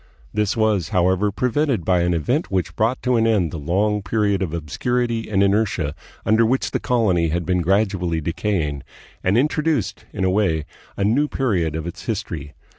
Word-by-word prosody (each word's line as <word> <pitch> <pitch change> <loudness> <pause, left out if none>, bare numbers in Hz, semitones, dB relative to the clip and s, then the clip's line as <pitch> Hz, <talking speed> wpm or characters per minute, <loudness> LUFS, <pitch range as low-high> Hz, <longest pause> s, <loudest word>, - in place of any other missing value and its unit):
This 105 +1 0
was, 105 -7 +1
however, 95 +3 +2
prevented 125 - 0
by 90 0 +3
an 85 0 +1
event 125 - 0
which 90 -3 -1
brought 115 +4 0
to 125 -1 +2
an 115 0 +3
end 100 -8 +2
the 80 - -5
long 100 +7 0
period 100 -1 0
of 90 -5 -1
obscurity 115 - -2
and 100 -2 +3
inertia 100 -7 +1 0.3
under 110 +1 +4
which 125 +4 +1
the - - 0
colony 100 -9 +2
had 85 +2 -1
been 90 +1 +1
gradually 95 -2 +1
decaying, 80 -3 -1 0.4
and 95 +4 +2
introduced, 150 -1 0
in 95 - -3
a 95 - +2
way, 85 -7 +1 0.3
a 100 - 0
new 125 +9 +2
period 90 - 0
of 80 0 -4
its 85 - -7
history. 75 -2 -4
100 Hz, 180 wpm, -21 LUFS, 85-110 Hz, 0.4 s, under